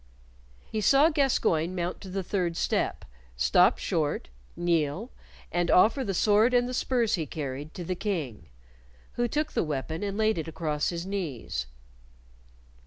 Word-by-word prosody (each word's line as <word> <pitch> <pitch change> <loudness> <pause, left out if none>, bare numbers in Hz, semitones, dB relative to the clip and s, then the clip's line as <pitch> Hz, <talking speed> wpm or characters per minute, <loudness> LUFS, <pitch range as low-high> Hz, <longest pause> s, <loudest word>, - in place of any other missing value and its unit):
He 215 - -1
saw 275 +9 +5
Gascoyne 185 - +1
mount 175 0 -3
to 195 - -9
the 190 +1 -3
third 175 -3 -1
step, - - -1 0.3
stop 65 0 +4
short, - - -1 0.3
kneel, 170 - 0 0.4
and 175 0 0
offer 225 +8 +5
the 195 -5 -2
sword 215 +6 +4
and 245 0 +3
the 250 - -4
spurs 240 -3 +1
he 160 -4 0
carried 145 0 -5
to 180 - -5
the 185 - -2
King, 155 - -4 0.6
who 240 0 0
took 300 +5 -1
the - - +1
weapon 155 +1 -3
and 200 -1 -3
laid 220 -4 +2
it 160 - -4
across 155 -2 -1
his 170 0 -4
knees. 145 - -4
180 Hz, 155 wpm, -28 LUFS, 155-220 Hz, 0.6 s, saw